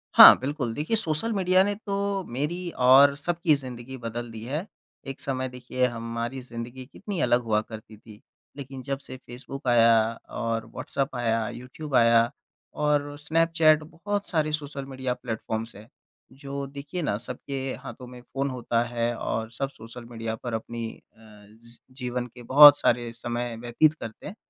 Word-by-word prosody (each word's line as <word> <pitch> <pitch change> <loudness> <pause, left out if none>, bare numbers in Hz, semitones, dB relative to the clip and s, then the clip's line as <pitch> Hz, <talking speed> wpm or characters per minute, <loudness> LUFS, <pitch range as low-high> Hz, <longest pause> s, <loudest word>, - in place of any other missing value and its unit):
हाँ - - +12
बिल्कुल। 130 -3 -3
देखिए, 155 - -1
सोशल 165 +4 0
मीडिया 185 -1 +4
ने 205 +1 0
तो 200 -2 -2
मेरी 165 +8 -3 0.2
और 140 +2 +8
सबकी 170 +1 +1
ज़िंदगी 130 -1 -7
बदल 120 0 -5
दी 110 0 -8
है। 150 +8 -3 0.4
एक 135 - -6
समय 130 -1 -2
देखिए 125 0 -2
हमारी 115 +3 -4
ज़िंदगी 125 +1 -8
कितनी 195 +7 -6
अलग 120 +1 +3
हुआ 105 -2 +1
करती 110 -1 -11
थी। 105 -1 -15 0.4
लेक़िन 135 -1 -7
जब 135 +1 -3
से 130 - -9
फेसबुक 130 +2 -9
आया 115 -1 +6 0.4
और 115 -1 -1
व्हाट्सएप 135 -1 -3
आया 115 -2 0
यूट्यूब 130 +4 -6
आया 115 -1 +6 0.6
और 145 -1 +1
स्नैपचैट 160 0 +3
बहुत 200 +6 -4
सारे 155 -3 0
सोशल 145 -2 -4
मीडिया 130 -2 -3
प्लेटफ़ॉर्म्स 110 -2 -5
है। 105 +2 -13 0.4
जो 140 0 -6
देखिए 140 +6 -6
न 105 -10 0
सबके 125 +4 -6 0.2
हाथों 125 +2 -9
में 125 0 -11
फ़ोन 135 +3 -3
होता 120 -2 0
है 120 0 0
और 110 0 -3
सब 135 +3 -3
सोशल 115 -2 -11
मीडिया 115 -1 -4
पर 120 - -4
अपनी 115 +1 -4 0.3
अ, 110 - -26
ज़ी 110 +2 -12 0.2
जीवन 125 -1 -3
के 120 +1 -14
बहुत 145 0 +11
सारे 120 -1 +1
समय 120 0 -4
व्यतीत 120 +6 +3
करते 115 -8 -9
हैं, 200 - -8
125 Hz, 165 wpm, -26 LUFS, 115-145 Hz, 0.6 s, हाँ